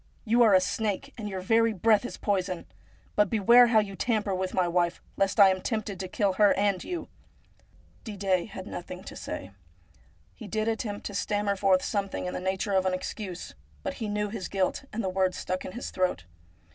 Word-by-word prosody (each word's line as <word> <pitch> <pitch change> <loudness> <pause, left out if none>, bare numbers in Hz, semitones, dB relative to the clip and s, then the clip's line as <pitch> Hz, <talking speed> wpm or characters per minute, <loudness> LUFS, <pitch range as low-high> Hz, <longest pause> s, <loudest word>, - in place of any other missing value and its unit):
You 235 +2 +3
are 220 -5 +7
a - - +7
snake, 210 +7 -2
and 215 -3 -5
your 190 -2 -4
very 225 +3 +3
breath 215 +3 +3
is - - -6
poison! 185 -3 -1 0.5
But 210 -2 +3
beware 235 +3 +6
how 230 -2 +3
you 205 -2 +1
tamper 215 -2 0
with 185 0 -2
my 185 -2 +1
wife, 175 0 +1 0.2
lest 195 +1 0
I 200 -1 +9
am 185 0 0
tempted 215 -3 -3
to 190 - -4
kill 195 +1 0
her 205 - +6
and 200 -3 +1
you. 355 -2 -5 0.5
' - - -31
Didet 195 -4 -1
had 190 -1 -8
nothing 180 +1 -7
to - - -9
say. 95 +2 -6 0.8
He 220 - -10
did 215 +2 -1
attempt 220 -2 -3
to 205 - -4
stammer 205 0 0
forth 190 -1 +3
something 200 -3 -2
in 180 - -3
the - - -3
nature 190 +2 -1
of 190 -1 +3
an 185 - +1
excuse, 185 -1 -6 0.3
but - - -2
he 220 - -1
knew 210 0 -1
his 200 -3 -5
guilt, 195 +6 -1
and 225 +1 -3
the - - -1
words 185 0 0
stuck 185 0 -3
in 185 - -7
his 240 - -5
throat. 185 - 0
200 Hz, 210 wpm, -28 LUFS, 185-215 Hz, 0.8 s, I